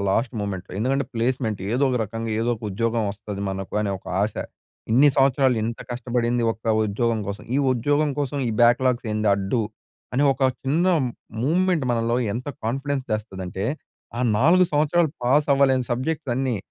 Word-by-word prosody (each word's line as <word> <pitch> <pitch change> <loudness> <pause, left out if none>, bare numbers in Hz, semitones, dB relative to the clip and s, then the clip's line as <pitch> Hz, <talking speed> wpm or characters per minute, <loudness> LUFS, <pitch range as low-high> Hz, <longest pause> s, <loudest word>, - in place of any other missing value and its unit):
Last 115 +6 +1
మూమెంట్‌లో. 95 -3 -5
ఎందుకంటే 135 +5 +1
placement 115 -3 -1
ఏదో 130 +4 +2
ఒక 125 - 0
రకంగా 115 +2 -5
ఏదో 115 - 0
ఒక 110 - -20
ఉద్యోగం 115 +3 0
వస్తది 100 0 -7
మనకు 95 0 -6
అనే 100 -2 -1
ఒక - - -24 0.2
ఆశ. 105 0 -1 0.6
ఇన్ని 135 +6 +6
సంవత్సరాలు 135 -2 +3
ఇంత 115 +1 -3
కష్టపడింది 120 0 -1
ఒక 110 0 -2
ఉద్యోగం 115 +2 0
కోసం. 100 - -5
ఈ - - +3 0.2
ఉద్యోగం 145 +5 +1
కోసం 145 0 -1
ఈ - - 0
బ్యాక్‌లాగ్స్ 120 0 +3
ఏంది 105 0 0
అడ్డు. 100 +4 -1 0.5
అని 140 +3 +3
ఒక 135 - -5 0.2
చిన్న 155 +7 +1 0.6
మూమెంట్ 175 +1 +2
మనలో 115 0 +1 0.2
ఎంత 125 +6 -4 0.2
కాన్ఫిడెన్స్ 135 +3 -2
తెస్తదంటే? 95 -3 -4 0.5
ఆ - - -1 0.2
4 170 +9 +5
సంవత్సరాలు 155 +2 +2
పాస్ 140 +5 +3
అవ్వలేని 135 -2 +3
సబ్జెక్ట్స్ 140 +2 -2
అన్నీ 130 -3 0
120 Hz, 160 wpm, -23 LUFS, 110-140 Hz, 0.6 s, ఇన్ని